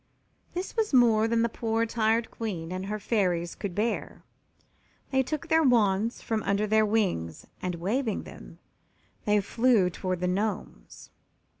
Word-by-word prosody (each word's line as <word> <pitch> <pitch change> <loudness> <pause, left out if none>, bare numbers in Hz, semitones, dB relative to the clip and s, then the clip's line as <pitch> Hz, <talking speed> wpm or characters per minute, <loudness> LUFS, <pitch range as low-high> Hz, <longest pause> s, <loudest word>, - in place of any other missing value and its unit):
This 360 +2 -4
was 440 - +1
more 225 -3 +5
than 230 0 +2
the - - +3
poor 225 0 -1
tired 225 0 +1
Queen 180 -7 -5
and 185 +1 -4
her 210 +1 -2
Fairies 180 -5 0
could 190 -4 -6
bear. 220 +2 -2 0.9
They 265 -1 +3
took 305 +5 -4
their 325 -1 +4
wands 225 -5 +2
from 220 -1 -1
under 200 +1 0
their 215 0 +3
wings 185 - -1 0.2
and, 180 -1 -2
waving 215 +7 -1
them, - - -12 0.7
they 210 0 +3
flew 225 -3 +2
toward 185 0 -3
the 180 - +1
Gnomes. 190 - -4
215 Hz, 150 wpm, -27 LUFS, 190-230 Hz, 0.9 s, more